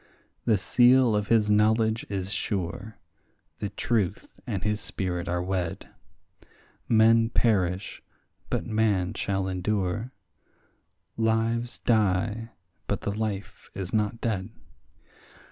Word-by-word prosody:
The 110 Hz, -3 st, +4 dB
seal 120 Hz, +2 st, +4 dB
of 105 Hz, -1 st, 0 dB
his 110 Hz, -2 st, +3 dB
knowledge 110 Hz, +1 st, +2 dB
is 95 Hz, -1 st, -3 dB
sure, 100 Hz, +3 st, -3 dB, 0.6 s
the 105 Hz, -, -3 dB
truth 105 Hz, -5 st, -1 dB, 0.2 s
and 100 Hz, -7 st, -2 dB
his 105 Hz, 0 st, 0 dB
spirit 90 Hz, -2 st, -3 dB
are 90 Hz, 0 st, -1 dB
wed; 90 Hz, -3 st, -3 dB, 1.0 s
Men 115 Hz, 0 st, +5 dB
perish, 95 Hz, -5 st, 0 dB, 0.5 s
but -, -, -1 dB
man 105 Hz, -4 st, +1 dB
shall 95 Hz, -3 st, -1 dB
endure; 95 Hz, +4 st, -1 dB, 1.1 s
lives 115 Hz, +1 st, 0 dB
die, 110 Hz, +1 st, +1 dB, 0.4 s
but -, -, -1 dB
the 100 Hz, -, -2 dB
life 105 Hz, -2 st, -4 dB
is 95 Hz, -2 st, -5 dB
not 105 Hz, +1 st, 0 dB
dead. 105 Hz, -4 st, -2 dB
105 Hz, 110 wpm, -27 LUFS, 95-115 Hz, 1.1 s, Men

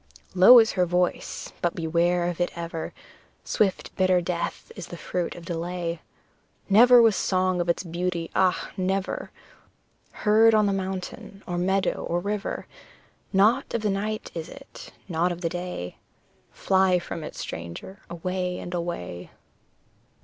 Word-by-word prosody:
Low 190 Hz, +7 st, +9 dB
is 225 Hz, -2 st, +6 dB
her 180 Hz, -2 st, +1 dB
voice, 180 Hz, +1 st, -1 dB
but 175 Hz, -, 0 dB
beware 175 Hz, +2 st, +1 dB
of 175 Hz, 0 st, -3 dB
it 175 Hz, -, +1 dB
ever, 165 Hz, -1 st, -5 dB, 0.5 s
Swift 195 Hz, -3 st, -1 dB
bitter 185 Hz, -1 st, +3 dB
death 175 Hz, 0 st, -4 dB
is -, -, -7 dB
the 175 Hz, -, -8 dB
fruit 175 Hz, 0 st, -3 dB
of 175 Hz, -, -10 dB
delay; 170 Hz, 0 st, -3 dB, 0.7 s
Never 240 Hz, +4 st, +7 dB
was 225 Hz, -3 st, +4 dB
song 185 Hz, -1 st, +1 dB
of 175 Hz, -, -2 dB
its 170 Hz, -, +1 dB
beauty 170 Hz, -1 st, -3 dB
ah! 185 Hz, -1 st, +1 dB
never 190 Hz, +1 st, -2 dB, 1.0 s
Heard 220 Hz, +1 st, +6 dB
on 215 Hz, -1 st, +4 dB
the 200 Hz, -, +1 dB
mountain, 190 Hz, +1 st, -5 dB
or 175 Hz, -1 st, -3 dB
meadow, 190 Hz, +2 st, 0 dB
or 175 Hz, -, -1 dB
river, 205 Hz, +2 st, -3 dB, 0.7 s
Not 215 Hz, +8 st, +3 dB
of 225 Hz, -, -2 dB
the 210 Hz, -, +1 dB
night 210 Hz, +2 st, -3 dB
is 165 Hz, 0 st, -6 dB
it, -, -, -12 dB, 0.2 s
not 175 Hz, 0 st, 0 dB
of 175 Hz, 0 st, -6 dB
the 165 Hz, -, 0 dB
day 175 Hz, -, -5 dB, 0.5 s
Fly 190 Hz, -1 st, +2 dB
from 170 Hz, -2 st, -6 dB
it, -, -, -8 dB
stranger, 85 Hz, -, -7 dB
away 180 Hz, +1 st, -3 dB
and 175 Hz, -, -7 dB
away. 170 Hz, -, -4 dB
180 Hz, 150 wpm, -25 LUFS, 170-195 Hz, 1.0 s, Low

